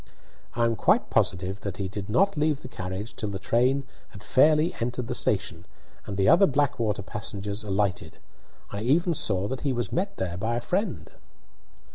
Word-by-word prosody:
"I 120 0 +2
am 115 -1 +1
quite - - +2
positive 95 +2 0
that 100 -3 -5
he 100 - -2
did 100 +1 -6
not 195 - +3
leave 150 -1 0
the - - -6
carriage 95 +4 -6
till 105 - -3
the 100 - -4
train 125 +8 +2 0.3
had 100 - -12
fairly 155 +8 +4
entered 120 +1 -2
the - - -3
station, - - 0 0.4
and 100 - -4
the 95 - +2
other 175 +6 +7
Blackwater 120 -8 0
passengers 105 0 -4
alighted. 95 -5 -1 0.5
I 100 - -4
even 165 +9 +2
saw 100 - +2
that 130 +2 -4
he 140 - 0
was 120 -1 -2
met 190 +3 -2
there 90 -2 -3
by 110 +5 -1
a - - 0
friend." 195 - -2
110 Hz, 180 wpm, -26 LUFS, 100-140 Hz, 0.5 s, other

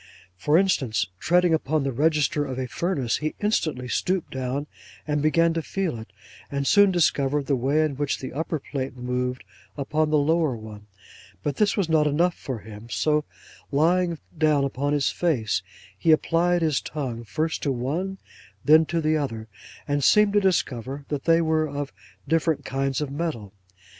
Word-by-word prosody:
For 150 - +2
instance, 130 - +1
treading 175 0 +3
upon 155 -1 +1
the 135 - -1
register 150 +3 +1
of 130 -3 -5
a 130 - -2
furnace, 130 -1 -1
he 155 0 -3
instantly 155 -11 0
stooped 185 +7 -1
down, 130 +2 -2 0.4
and 150 -1 0
began 165 +2 +3
to 165 - -1
feel 175 -7 -3
it, 110 -4 -11 0.4
and 140 0 -2
soon 205 +6 +6
discovered 145 -5 +1
the 140 - +1
way 140 +5 +2
in 145 -4 -2
which 145 -1 -1
the 130 - -7
upper 160 +3 -2
plate 135 -2 -5
moved 125 +1 -2 0.3
upon 150 +2 0
the 155 - +3
lower 150 -3 +2
one; 105 -1 -11 0.6
but 145 -2 -2
this 210 0 +2
was 195 -5 +1
not 155 -2 +3
enough 170 +5 +2
for 130 -6 -5
him, 105 +2 -11
so 150 +4 +1 0.5
lying 170 +4 +2 0.2
down 155 -3 +3
upon 140 +1 -1
his 145 -2 +1
face, 120 - 0 0.3
he 130 - +2
applied 170 +2 +2
his 155 -4 +1
tongue 125 -6 -5
first 155 +8 -2
to 140 - 0
one, 155 +10 -2 0.5
then 155 +2 +6
to 170 -1 -1
the 155 0 +2
other, 115 -7 -4 0.4
and 145 -1 0
seemed 210 +5 +5
to 205 - +5
discover 140 - -1
that 145 -2 -3
they 165 0 +4
were 160 -1 +1
of 145 0 -5 0.3
different 160 0 +1
kinds 135 +1 -1
of 145 -2 -3
metal. 140 - -4
150 Hz, 175 wpm, -25 LUFS, 130-165 Hz, 0.6 s, soon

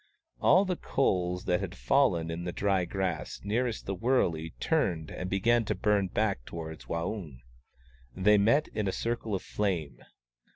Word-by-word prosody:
All 195 - +5
the 180 -2 -1
coals 90 -8 0
that 90 0 +2
had 95 -1 -5
fallen 100 -13 +2
in 85 +1 -4
the 90 - -3
dry 95 -1 +1
grass 95 0 -3
nearest 115 +3 -1
the 100 - -2
wurley 90 - 0
turned 80 +5 0
and 90 - -5
began 115 +5 +3
to - - -1
burn 105 -2 +2
back 100 - -1
towards 80 +2 -7
Waung. 85 - -4 0.8
They 105 +2 +4
met 130 +9 +3
in 105 -2 -2
a - - +1
circle 115 -3 -2
of 95 - -4
flame. 85 -12 -2
95 Hz, 160 wpm, -29 LUFS, 85-110 Hz, 0.8 s, All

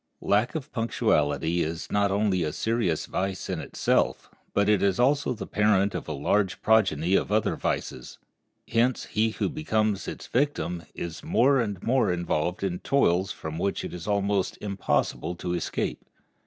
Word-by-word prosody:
Lack 105 +7 +2
of 155 -1 -5
punctuality 85 - +1
is 80 +1 -4
not 100 -1 +2
only 100 -2 +1
a 75 -2 -1
serious 110 -5 0
vice 95 0 -3
in - - -2
itself, - - 0 0.2
but 100 0 +2
it 105 -2 +3
is 100 +2 +2
also 135 +2 +3
the 115 - -6
parent 105 -1 +2
of - - -5
a - - -3
large 90 +7 0
progeny 95 -6 +3
of 100 - +2
other 105 0 +2
vices. 65 - -3 0.5
Hence 120 +2 +1
he 110 +1 +1
who 110 - -2
becomes 110 -9 -1
its - - -6
victim 120 - -1
is 85 -1 -5
the - - -12
more 135 +3 +4
and 105 -6 -2
more 125 -5 +2
involved 85 0 -1
in 90 -2 -1
toils 95 -8 +2
from 80 +1 -6
which 100 +2 -1
it - - -6
is 90 +1 -7
almost 100 -2 0
impossible 100 -3 -1
to 90 0 -3
escape. 85 - -2
100 Hz, 170 wpm, -26 LUFS, 90-110 Hz, 0.5 s, more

